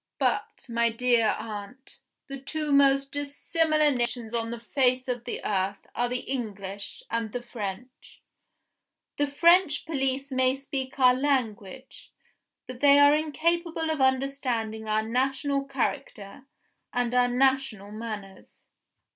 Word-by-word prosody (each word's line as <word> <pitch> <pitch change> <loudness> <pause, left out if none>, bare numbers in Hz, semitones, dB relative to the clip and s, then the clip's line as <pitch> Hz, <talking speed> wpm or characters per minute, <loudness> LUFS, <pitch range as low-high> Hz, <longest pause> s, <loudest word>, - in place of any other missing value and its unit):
But, - - -1
my 235 -1 +2
dear 230 -1 +2
aunt, 215 +4 -9 0.3
the 275 -1 -7
two 300 +2 -3
most 275 -1 +4
dissimilar 305 +2 +1
nations 240 -2 -2
on 230 -1 -1
the 235 0 -5
face 255 +1 +1
of 245 -1 -3
the - - -5
earth 195 0 -1
are 245 0 0
the 250 0 -2
English 200 -6 -6
and 230 -1 -2
the 245 +1 -5
French. 235 +1 -8 1.0
The 290 - +1
French 335 +2 +4
police 275 -3 -2
may 260 0 +2
speak 270 -1 -5
our 250 -2 +6
language 255 -3 -3 0.5
but 255 -1 -9
they 285 0 +6
are 285 0 +7
incapable 325 +2 0
of 310 -3 -2
understanding 255 -5 0
our 215 0 +1
national 270 +4 0
character 260 -3 -4 0.4
and 245 -1 -1
our 250 0 +4
national 250 -5 +1
manners. 210 -3 -8
255 Hz, 130 wpm, -27 LUFS, 230-280 Hz, 1.0 s, are